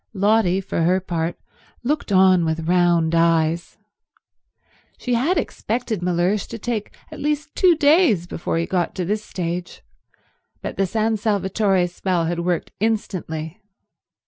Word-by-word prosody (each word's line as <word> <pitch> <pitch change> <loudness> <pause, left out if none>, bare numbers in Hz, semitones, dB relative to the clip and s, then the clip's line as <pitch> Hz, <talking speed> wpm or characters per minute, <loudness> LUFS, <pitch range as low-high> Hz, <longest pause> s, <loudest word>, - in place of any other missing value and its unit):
Lotty, 200 -2 +2
for 185 - -3
her 180 +3 +3
part, 170 -2 -3 0.5
looked 285 -2 -1
on 185 -2 +5
with 160 0 -2
round 175 -2 +3
eyes. 165 0 +1 1.2
She 250 - -2
had 275 +11 +2
expected 225 -3 -2
Mellersh 180 +3 0
to 230 - -7
take 225 -1 -4 0.2
at 310 - -9
least 300 +1 -2
two 365 -3 +5
days 295 - +4
before 170 -1 -3
he 165 - 0
got 180 -1 -1
to 180 - -2
this 210 +4 -1
stage, 175 -1 -5 0.8
but - - -4
the 195 - +1
San 220 +2 0
Salvatore 200 -2 +1
spell 180 -1 -1
had 170 +1 -2
worked 175 0 -1
instantly. 185 -5 -3
185 Hz, 140 wpm, -21 LUFS, 170-220 Hz, 1.2 s, on